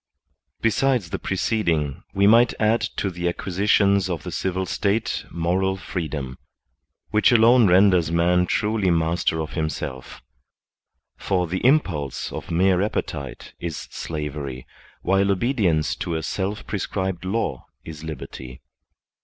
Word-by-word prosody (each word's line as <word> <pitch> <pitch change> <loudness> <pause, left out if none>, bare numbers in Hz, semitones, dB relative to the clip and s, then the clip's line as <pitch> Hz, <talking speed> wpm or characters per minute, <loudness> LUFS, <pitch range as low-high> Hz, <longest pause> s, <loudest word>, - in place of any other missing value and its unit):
Besides 115 -5 +1
the - - -2
preceding, 85 - -1
we 100 +1 +2
might 115 +3 +5
add 110 +1 +3 0.2
to 100 - -1
the 85 0 -1
acquisitions 100 +1 +2
of 85 -4 -3
the - - -6
civil 95 0 -2
state 105 +5 -1
moral 95 +3 0
freedom, 75 -8 -5 0.7
which 105 +3 +4
alone 120 0 +6
renders 90 -3 +4
man 90 +2 +3
truly 105 -1 +1
master 80 -1 +1
of 80 -1 -4
himself; 80 -5 -5 0.9
for 90 -2 0
the 90 +2 -3
impulse 95 - +1
of - - -7
mere 90 +2 +3
appetite 70 - -4
is 85 -3 -4
slavery, 75 -4 -5 0.4
while 95 +1 +2
obedience 100 - +1
to 85 - -3
a 80 - -3
self 100 +2 -3
prescribed 95 -2 -3
law 95 - -2 0.2
is 80 -1 -9
liberty. 65 -5 -8
90 Hz, 125 wpm, -23 LUFS, 80-100 Hz, 0.9 s, alone